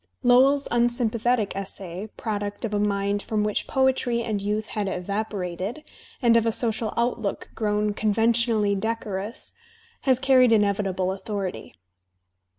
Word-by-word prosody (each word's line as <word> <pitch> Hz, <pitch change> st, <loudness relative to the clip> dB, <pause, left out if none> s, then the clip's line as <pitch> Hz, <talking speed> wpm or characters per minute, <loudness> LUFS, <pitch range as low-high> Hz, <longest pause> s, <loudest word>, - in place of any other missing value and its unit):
Lowell's 265 Hz, +3 st, +5 dB
unsympathetic 240 Hz, -2 st, +1 dB
essay, 195 Hz, 0 st, -6 dB
product 205 Hz, 0 st, -3 dB
of 215 Hz, -, -4 dB
a 205 Hz, -, +1 dB
mind 200 Hz, 0 st, 0 dB
from 215 Hz, 0 st, -1 dB
which 210 Hz, -1 st, -1 dB
poetry 260 Hz, -3 st, +1 dB
and 215 Hz, -3 st, -2 dB
youth 210 Hz, +2 st, -1 dB
had 210 Hz, -2 st, -1 dB
evaporated, 195 Hz, -, -3 dB, 0.4 s
and 235 Hz, -1 st, +5 dB
of 230 Hz, 0 st, +3 dB
a -, -, +3 dB
social 225 Hz, -1 st, 0 dB
outlook 235 Hz, -4 st, -1 dB
^* -, -, -28 dB
grown 210 Hz, -1 st, 0 dB
conventionally 220 Hz, 0 st, +2 dB
decorous, 210 Hz, 0 st, -3 dB, 0.5 s
has 260 Hz, -2 st, +3 dB
carried 255 Hz, -2 st, +5 dB
inevitable 200 Hz, -3 st, +1 dB
authority. 195 Hz, -1 st, -5 dB
215 Hz, 130 wpm, -25 LUFS, 200-235 Hz, 0.5 s, Lowell's